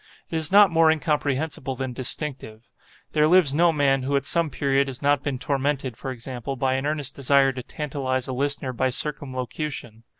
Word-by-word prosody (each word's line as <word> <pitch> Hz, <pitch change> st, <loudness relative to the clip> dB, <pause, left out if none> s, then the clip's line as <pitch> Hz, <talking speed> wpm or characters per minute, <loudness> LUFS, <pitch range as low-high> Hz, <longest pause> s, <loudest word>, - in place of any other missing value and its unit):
It -, -, -3 dB
is 160 Hz, 0 st, 0 dB
not 200 Hz, -2 st, +7 dB
more 165 Hz, -1 st, +5 dB
incomprehensible 150 Hz, -3 st, -1 dB
than 130 Hz, 0 st, -4 dB
distinctive. 125 Hz, -3 st, -5 dB, 0.4 s
There 150 Hz, 0 st, +3 dB
lives 170 Hz, -4 st, +5 dB
no 170 Hz, +3 st, +4 dB
man 140 Hz, -3 st, +2 dB
who 140 Hz, +2 st, -1 dB
at 140 Hz, -, 0 dB
some 170 Hz, 0 st, +1 dB
period 140 Hz, 0 st, +1 dB
has 135 Hz, +1 st, -7 dB
not 145 Hz, -1 st, +3 dB
been 140 Hz, -3 st, -2 dB
tormented, 135 Hz, -2 st, -1 dB
for 135 Hz, -, -6 dB
example, 130 Hz, +1 st, -5 dB
by 130 Hz, 0 st, 0 dB
an 135 Hz, +2 st, -1 dB
earnest 145 Hz, -2 st, -2 dB
desire 140 Hz, 0 st, +3 dB
to 130 Hz, -1 st, -6 dB
tantalize 130 Hz, -2 st, -3 dB
a 130 Hz, -, -3 dB
listener 140 Hz, 0 st, -2 dB
by 130 Hz, +2 st, +1 dB
circumlocution. 130 Hz, -3 st, -4 dB
140 Hz, 185 wpm, -24 LUFS, 130-150 Hz, 0.4 s, not